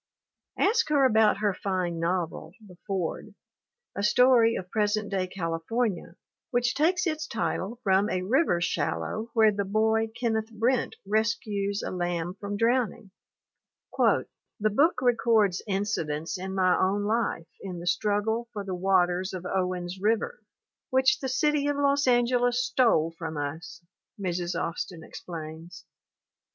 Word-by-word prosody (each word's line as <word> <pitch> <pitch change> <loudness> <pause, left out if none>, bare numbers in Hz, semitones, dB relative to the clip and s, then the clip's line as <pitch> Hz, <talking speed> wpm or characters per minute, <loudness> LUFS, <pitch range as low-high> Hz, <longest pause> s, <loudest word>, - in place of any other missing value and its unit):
Ask 450 0 +2
her 285 -3 +4
about 220 -4 +4
her 205 -2 +2
fine 185 -3 -2
novel 170 -1 -2
The 185 -3 -14
Ford, 190 -5 -3 0.6
a - - -2
story 230 +2 +5
of 180 -1 -6
present 210 -1 0
day 190 -2 0
California 180 +4 -2 0.3
which 245 -1 +1
takes 350 +6 +2
its 315 -1 -2
title 225 0 -3
from 195 +2 +3
a 185 -3 -1
river 240 - +2
shallow 170 - -2
where 220 -1 +6
the 200 0 -2
boy 220 +2 +1
Kenneth 220 -2 -1
Brent 235 +3 0
rescues 205 -1 -1
a - - -3
lamb 175 -1 -2
from 200 0 -4
drowning: 230 -2 0 0.9
"The - - +4 0.5
book 285 - +2
records 225 -6 +3
incidents 170 -6 -2
in 190 +1 -5
my 185 -1 +3
own 195 +2 +1
life 210 -6 -1
in 185 -3 -6
the 170 - -8
struggle 215 +5 0
for 205 -2 -4
the 190 -1 -5
waters 185 0 +1
of 180 0 -7
Owens 180 -1 -2
River 230 - 0 0.5
which 260 0 +3
the 265 - -3
city 290 +2 +1
of 290 -1 0
Los 280 0 +2
Angeles 245 0 +2
stole 235 - +2
from 160 -2 -5
us," 160 +3 -6 0.3
Mrs. 175 -2 -2
Austin 165 0 -4
ex - - -10
plains. 160 0 -8
205 Hz, 140 wpm, -27 LUFS, 180-235 Hz, 0.9 s, where